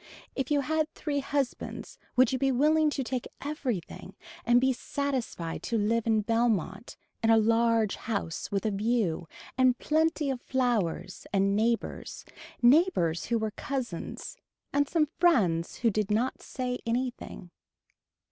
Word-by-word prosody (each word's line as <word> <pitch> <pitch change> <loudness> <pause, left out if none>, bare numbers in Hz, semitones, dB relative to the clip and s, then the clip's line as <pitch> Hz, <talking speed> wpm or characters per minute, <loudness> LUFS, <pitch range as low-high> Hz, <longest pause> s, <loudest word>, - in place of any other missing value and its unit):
If 270 -1 -2
you 290 -1 +3
had 315 +2 0
three 290 -2 -2
husbands 275 -1 -3 0.2
would 255 -1 +5
you 260 - 0
be 270 -1 +2
willing 305 +4 +3
to 280 -2 -2
take 250 -1 -3
everything 265 - -4 0.3
and 240 +1 +5
be 265 +1 +2
satisfied 250 -12 -3
to 230 - -1
live 225 +2 +1
in 220 -1 +3
Belmont 225 -3 -1 0.2
in 225 - +2
a 225 - +7
large 225 -1 +2
house 200 -7 -3
with 200 +1 -1
a 215 - +1
view 200 -5 0 0.3
and 255 -1 +4
plenty 310 -2 +1
of 255 -2 -4
flowers 215 -8 -1
and 195 0 +2
neighbors, 230 +2 -1 0.4
neighbors 240 - +4
who 235 - +1
were 220 -1 -2
cousins 255 - -5 0.4
and 285 0 +2
some 320 -3 +2
friends 185 - +3
who 230 - +5
did 210 0 -1
not 225 +5 0
say 250 -1 -4
anything. 240 -6 -3
240 Hz, 145 wpm, -28 LUFS, 215-270 Hz, 0.4 s, a